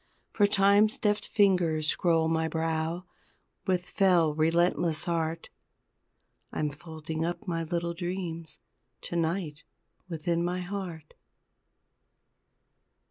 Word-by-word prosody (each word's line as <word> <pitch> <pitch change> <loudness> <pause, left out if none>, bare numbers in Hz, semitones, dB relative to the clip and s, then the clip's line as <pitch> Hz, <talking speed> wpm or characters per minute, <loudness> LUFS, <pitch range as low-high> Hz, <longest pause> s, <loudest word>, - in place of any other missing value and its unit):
For 205 - +4
Time's 200 +2 +4
deft 210 0 0
fingers 180 -7 +2
scroll 165 -1 +2
my 160 0 +1
brow 160 +2 -2 0.6
With 180 -1 +1
fell 180 -5 +3
relentless 165 +1 +2
art 165 -1 -1 1.0
I'm 150 -1 -1
folding 160 +1 -5
up 175 +5 -3
my 165 -2 -1
little 170 +1 -2
dreams 170 -2 -5 0.4
To - - -5
night, 165 -2 -1 0.5
within 170 +1 -1
my 180 +1 -1
heart! 180 -5 -6
170 Hz, 100 wpm, -29 LUFS, 160-180 Hz, 1.0 s, For